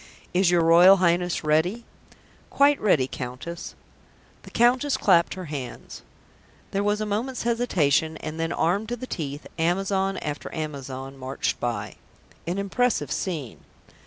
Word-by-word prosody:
"Is 180 Hz, 0 st, +3 dB
your 175 Hz, -1 st, +3 dB
Royal 175 Hz, +4 st, +7 dB
Highness 175 Hz, -1 st, +1 dB
ready?" 160 Hz, +10 st, +1 dB, 0.6 s
"Quite 285 Hz, +1 st, +3 dB
ready, 155 Hz, -11 st, +3 dB
Countess." 130 Hz, +7 st, -7 dB, 0.7 s
The -, -, -13 dB
Countess 250 Hz, +4 st, +2 dB
clapped 170 Hz, -4 st, +3 dB
her 185 Hz, -1 st, -6 dB
hands. 145 Hz, -5 st, -7 dB, 0.7 s
There 195 Hz, -, 0 dB
was 205 Hz, +1 st, 0 dB
a -, -, -1 dB
moment's 225 Hz, +5 st, -2 dB
hesitation, 160 Hz, -, +1 dB
and 155 Hz, +1 st, -6 dB
then, 165 Hz, 0 st, -1 dB
armed 200 Hz, +8 st, 0 dB
to 240 Hz, -, -1 dB
the 245 Hz, -, -7 dB
teeth, 145 Hz, -, -5 dB
Amazon 195 Hz, +3 st, 0 dB
after 145 Hz, -1 st, -5 dB
Amazon 135 Hz, -3 st, -6 dB
marched 130 Hz, +1 st, -2 dB
by.... 105 Hz, -4 st, -3 dB, 0.5 s
An 175 Hz, +3 st, -2 dB
impressive 225 Hz, +5 st, 0 dB
scene. 155 Hz, -, -3 dB
175 Hz, 135 wpm, -25 LUFS, 150-205 Hz, 0.7 s, Royal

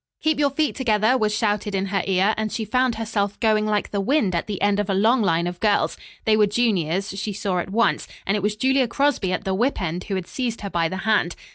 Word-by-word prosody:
"Keep 315 Hz, -1 st, +1 dB
your 285 Hz, -1 st, +3 dB
feet 295 Hz, +2 st, 0 dB
together!" 220 Hz, -2 st, +2 dB
was 215 Hz, -4 st, +1 dB
shouted 210 Hz, -1 st, -1 dB
in 195 Hz, 0 st, 0 dB
her 195 Hz, -, +2 dB
ear, 195 Hz, +2 st, +2 dB
and 215 Hz, -1 st, -2 dB
she 220 Hz, -, -3 dB
found 250 Hz, +2 st, +1 dB
herself 210 Hz, -3 st, -2 dB
going 215 Hz, -2 st, +2 dB
like 210 Hz, -1 st, -1 dB
the 200 Hz, -, -1 dB
wind 215 Hz, -4 st, +1 dB
at 170 Hz, -, -1 dB
the 205 Hz, -3 st, -4 dB
end 205 Hz, 0 st, +2 dB
of 205 Hz, 0 st, -2 dB
a 195 Hz, -, +1 dB
long 225 Hz, +6 st, +3 dB
line 170 Hz, -4 st, +1 dB
of 175 Hz, 0 st, -5 dB
girls. 210 Hz, -2 st, +1 dB, 0.3 s
They 220 Hz, -, +4 dB
were 210 Hz, -1 st, +4 dB
juniors, 195 Hz, -5 st, 0 dB
she 200 Hz, +1 st, -4 dB
saw 190 Hz, -2 st, -2 dB
at 175 Hz, -, -4 dB
once, 230 Hz, +4 st, +1 dB, 0.2 s
and 195 Hz, -, +1 dB
it 210 Hz, -, -1 dB
was 210 Hz, +2 st, 0 dB
Julia 260 Hz, +3 st, +2 dB
Crosby 270 Hz, -6 st, 0 dB
at 180 Hz, -, -2 dB
the 190 Hz, -, -1 dB
whip 240 Hz, +8 st, 0 dB
end 175 Hz, 0 st, -3 dB
who 200 Hz, -, -3 dB
had 185 Hz, -2 st, -3 dB
seized 235 Hz, +2 st, -4 dB
her 200 Hz, -2 st, -5 dB
by 165 Hz, -1 st, +1 dB
the 185 Hz, -, -4 dB
hand. 210 Hz, -5 st, +2 dB
210 Hz, 255 wpm, -23 LUFS, 195-230 Hz, 0.3 s, They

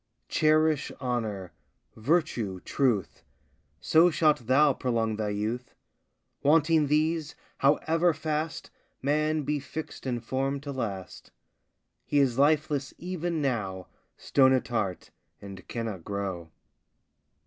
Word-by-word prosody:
Cherish 155 Hz, -1 st, +2 dB
honour, 110 Hz, -, -3 dB, 0.4 s
virtue, 115 Hz, -, 0 dB
truth, 120 Hz, -10 st, 0 dB, 0.6 s
So 160 Hz, -, +5 dB
shalt 155 Hz, -7 st, +2 dB
thou 140 Hz, +2 st, +5 dB
prolong 115 Hz, -4 st, -1 dB
thy 105 Hz, -1 st, -1 dB
youth. 110 Hz, +5 st, -3 dB, 0.7 s
Wanting 155 Hz, +1 st, +4 dB
these, 155 Hz, +2 st, 0 dB, 0.2 s
however 160 Hz, +5 st, +3 dB
fast 155 Hz, 0 st, -3 dB, 0.3 s
Man 155 Hz, +2 st, +1 dB
be 150 Hz, +1 st, -1 dB
fix'd 145 Hz, 0 st, -7 dB
and 120 Hz, -2 st, -2 dB
form'd 135 Hz, +3 st, -2 dB
to 145 Hz, -, -5 dB
last, 100 Hz, -8 st, -5 dB, 0.7 s
He 145 Hz, -, -1 dB
is 135 Hz, -3 st, +3 dB
lifeless 145 Hz, -1 st, +2 dB
even 175 Hz, -3 st, -3 dB
now, 100 Hz, -8 st, -2 dB, 0.3 s
Stone 130 Hz, -1 st, +4 dB
at 130 Hz, -, 0 dB
heart, 105 Hz, -6 st, -2 dB, 0.3 s
and 100 Hz, -2 st, -10 dB
cannot 110 Hz, -7 st, -4 dB
grow. 95 Hz, -4 st, -4 dB
135 Hz, 110 wpm, -28 LUFS, 110-155 Hz, 0.7 s, So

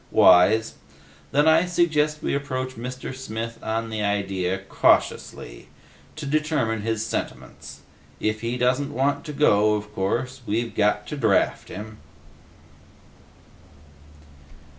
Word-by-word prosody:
"Wise. 105 Hz, +5 st, +5 dB, 0.6 s
Then 145 Hz, +3 st, +3 dB
I 160 Hz, +3 st, +5 dB
suggest 155 Hz, -3 st, +1 dB
we -, -, -1 dB
approach 130 Hz, -2 st, -3 dB
Mr. 130 Hz, +2 st, -7 dB
Smith 115 Hz, -2 st, -6 dB
on 115 Hz, +1 st, -3 dB
the 110 Hz, -1 st, -3 dB
idea, 95 Hz, -2 st, -1 dB
cautiously, -, -, 0 dB, 0.5 s
to 155 Hz, -, -7 dB
determine 145 Hz, -7 st, 0 dB
his 110 Hz, 0 st, -2 dB
sentiments. 65 Hz, -, -6 dB, 0.4 s
If 110 Hz, 0 st, -1 dB
he 115 Hz, +2 st, -2 dB
doesn't 130 Hz, +4 st, +1 dB
want 140 Hz, +2 st, 0 dB
to 150 Hz, -, -5 dB
go, 105 Hz, -7 st, +3 dB
of 105 Hz, 0 st, -6 dB
course, 125 Hz, +7 st, -2 dB
we've 115 Hz, +3 st, -1 dB
got 105 Hz, 0 st, +1 dB
to 150 Hz, -, -6 dB
draft 110 Hz, -7 st, +1 dB
him." 105 Hz, +2 st, -8 dB
115 Hz, 120 wpm, -24 LUFS, 105-140 Hz, 0.6 s, Wise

